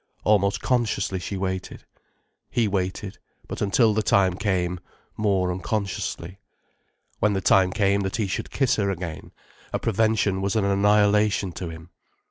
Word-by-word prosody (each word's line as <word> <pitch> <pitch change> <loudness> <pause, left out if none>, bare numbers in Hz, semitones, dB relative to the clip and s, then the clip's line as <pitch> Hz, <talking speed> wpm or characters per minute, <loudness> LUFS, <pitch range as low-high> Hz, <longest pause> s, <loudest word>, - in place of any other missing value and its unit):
Almost 100 -2 +2
consciously, 110 -6 0
she 95 +2 -5
waited. 95 -1 -4 0.6
He 115 -3 +1
waited, 95 0 -3 0.3
but, - - -6
until 110 +2 +3
the 110 - +1
time 95 -3 +3
came, 90 -2 -1 0.4
more 95 -4 +1
unconsciously. 95 -2 -3 0.8
When 105 0 +2
the 95 - 0
time 95 -1 +4
came 100 0 +2
that 95 -1 -2
he 110 - 0
should 95 - -3
kiss 135 -4 +1
her 100 -2 +1
again, 90 -4 -5 0.4
a - - 0
prevention 110 -3 +1
was 100 +2 -1
an 110 -3 +2
annihilation 105 0 +3
to 85 0 -6
him. 80 +1 -11
100 Hz, 145 wpm, -24 LUFS, 95-105 Hz, 0.8 s, time